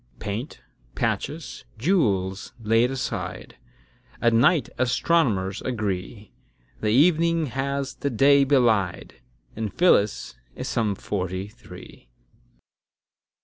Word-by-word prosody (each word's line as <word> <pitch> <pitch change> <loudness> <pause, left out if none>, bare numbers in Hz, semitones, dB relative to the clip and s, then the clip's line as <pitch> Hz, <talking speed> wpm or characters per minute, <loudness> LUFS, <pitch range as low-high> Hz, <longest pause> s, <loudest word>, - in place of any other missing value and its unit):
Paint, 110 +8 -5 0.3
patches, - - -3
jewels 100 - 0
laid 115 +2 +2
aside, 95 -9 -5 0.6
At 120 -1 +2
night 135 +3 +4
astronomers 120 - +1
agree, 105 -2 -4 0.5
The 105 - -1
evening 165 +5 +3
has 140 +1 -2
the 140 - -3
day 140 +3 +5
belied; 115 -10 +1 0.3
And 110 -2 -3
Phyllis 105 - +2 0.2
is - - -5
some 105 -3 0
forty 95 0 -4
three. 65 - -14
115 Hz, 95 wpm, -24 LUFS, 100-140 Hz, 0.6 s, day